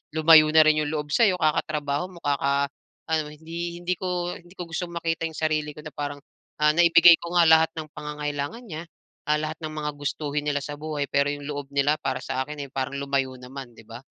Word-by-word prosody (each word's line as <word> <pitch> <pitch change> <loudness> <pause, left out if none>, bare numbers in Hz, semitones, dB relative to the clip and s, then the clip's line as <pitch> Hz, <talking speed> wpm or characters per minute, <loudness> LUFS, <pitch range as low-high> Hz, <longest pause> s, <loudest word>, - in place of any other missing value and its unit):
lumayo 155 -1 +7
na 160 - +8
rin 155 0 +4
'yung 150 - -1
loob 150 -1 -3
sa'yo 200 +3 +4
kakatrabaho 150 0 0
mo, 175 - -12
kaka-ano, 140 +2 -1
hindi 170 +2 -6
hindi 180 +1 +1
ko 180 -1 -2
hindi 175 +1 -18
ko 180 - -5
gustong 170 +1 -4
makita 165 -1 -1
yung 160 - -13
sarili 155 -1 0
ko 150 - -10
na 150 - -8
parang, 145 -1 -5 0.4
ah, 150 0 +6
naibigay 170 0 +7
ko 170 +1 -6
nga 175 - +6
lahat 160 0 +6
ng 155 -1 -5
pangangailangan 150 +7 -4
niya, 160 -4 -6 0.4
ah, 150 0 +2
lahat 155 0 -4
ng 155 0 -4
mga 150 -1 -2
gustuhin 145 0 -3
nila 145 -1 0
sa 145 0 -6
buhay, 150 -1 -3
pero 140 0 +2
yung 145 0 -8
loob 145 -1 -5
nila 145 +2 +2
para 130 -3 -2
sa 130 +1 -2
akin, 150 0 -6
eh, - - -22
parang 135 0 -3
lumayo 135 -2 -1
naman, 125 -1 -9
'di 115 - -15
ba? 115 +1 -8
150 Hz, 210 wpm, -25 LUFS, 145-165 Hz, 0.4 s, na